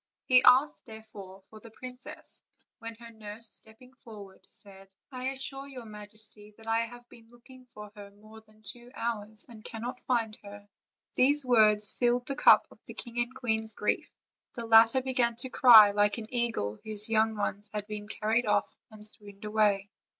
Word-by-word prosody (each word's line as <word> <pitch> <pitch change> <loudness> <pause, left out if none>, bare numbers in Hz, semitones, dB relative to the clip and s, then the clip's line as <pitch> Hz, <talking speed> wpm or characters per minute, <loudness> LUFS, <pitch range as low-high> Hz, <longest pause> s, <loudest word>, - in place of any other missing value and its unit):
He 255 -1 +5
asked 255 +3 +4
therefore 210 -4 -12
for 215 - -15
the 230 - -13
princess, 250 +3 -10 0.4
when 230 0 -8
her 235 +1 -13
nurse, 220 0 -5
stepping 230 +4 -6
forward, 210 -7 -14
said: 195 -1 -14 0.2
"I 255 0 -5
assure 270 +1 -4
your 255 -4 -10
majesty 210 0 -3
that 225 - -16
I 225 +1 0
have 240 0 -14
been 230 -1 -18
looking 250 +2 -18
for 210 -3 -12
her 205 -1 -11
more 215 +2 -16
than 215 0 -26
two 240 +3 -5
hours, 215 -2 -4
and 225 -3 -14
cannot 240 +2 -7
find 230 -4 -1
her." 205 0 -13 0.5
These 285 +2 +3
words 215 -4 +4
filled 245 0 0
the 275 - -3
cup - - +6
of - - -18
the - - -10
king 240 -1 -6
and 240 +2 -2
queen's 220 -2 -3
grief; 210 - -2 0.5
the 235 -2 -5
latter 230 +3 +5
began 250 -3 0
to 250 +3 -8
cry 225 -5 +8
like 205 +1 +1
an 225 +1 -9
eagle 225 - -2
whose 215 -1 0
young 220 0 +1
ones 205 0 -4
have 210 -1 -5
been 210 -1 -7
carried 220 +2 -1
off, 205 -1 0
and 215 -1 -9
swooned 205 -1 -3
away. 205 -2 +1
220 Hz, 180 wpm, -29 LUFS, 210-240 Hz, 0.5 s, cry